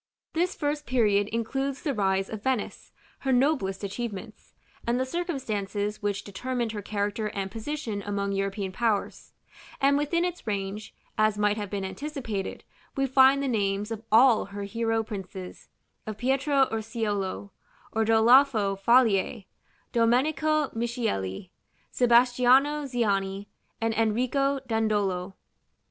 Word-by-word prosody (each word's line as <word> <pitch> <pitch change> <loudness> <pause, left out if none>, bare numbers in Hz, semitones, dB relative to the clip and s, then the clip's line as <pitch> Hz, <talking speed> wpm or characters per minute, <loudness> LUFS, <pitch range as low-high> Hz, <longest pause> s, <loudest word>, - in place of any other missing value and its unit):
This 350 +3 0
first 295 0 -2
period 210 -5 +2
includes 270 +6 -2
the 290 -5 0
rise 195 -3 +1
of 215 -2 -6
Venice, 255 -2 -2 0.3
her 265 - -1
noblest 245 -8 +1
achievements, 210 0 -6 0.3
and 240 +1 +1
the 260 - +1
circumstances 215 - -3
which 205 -1 -2
determined 240 +3 -3
her 210 -2 -5
character 205 +1 -2
and 195 -2 -4
position 225 -3 -4
among 200 0 -2
European 195 0 -2
powers; 215 0 -2 0.5
and 280 +1 +3
within 335 +4 +1
its 355 -8 -5
range, 200 +1 -4 0.2
as 215 -1 +3
might 210 0 +2
have 205 -2 -5
been 195 -1 -3
anticipated, 235 -3 -5 0.3
we 270 - +2
find 270 +1 +5
the - - 0
names 205 -2 -1
of 220 -1 -4
all 230 +1 +6
her 200 +1 -7
hero 225 +2 -1
princes, 190 -3 -8 0.4
of 215 -1 -5
Pietro 270 +3 +2
Urseolo, 210 -3 -3 0.4
Ordalafo 225 -1 +4
Falier, 225 -4 +3 0.5
Domenico 290 +6 +2
Michieli, 225 - -3 0.4
Sebastiano 250 +4 +4
Ziani, 200 -6 -1 0.3
and 225 0 0
Enrico 255 +5 +1
Dandolo. 205 -5 0
225 Hz, 125 wpm, -27 LUFS, 200-260 Hz, 0.5 s, all